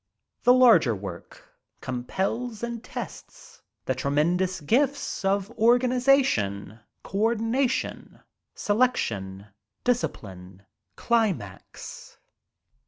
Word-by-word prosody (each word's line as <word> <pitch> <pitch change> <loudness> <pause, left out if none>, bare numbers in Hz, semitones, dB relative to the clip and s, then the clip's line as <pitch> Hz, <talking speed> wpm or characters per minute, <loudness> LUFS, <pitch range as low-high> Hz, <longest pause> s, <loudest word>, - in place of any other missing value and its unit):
The 245 - +6
larger 220 - +5
work 95 -3 -10 0.3
compels 195 - -3
and 235 -1 -4
tests 475 - -9 0.2
the - - 0
tremendous 175 +6 0
gifts 265 - 0
of 195 +2 0
organization, 240 - +2 0.2
co 195 - -4
ordination, 235 +4 -1 0.4
selection, 110 - -1 0.4
discipline, 95 - -3 0.3
climax. 200 - -3
205 Hz, 75 wpm, -26 LUFS, -, 0.4 s, The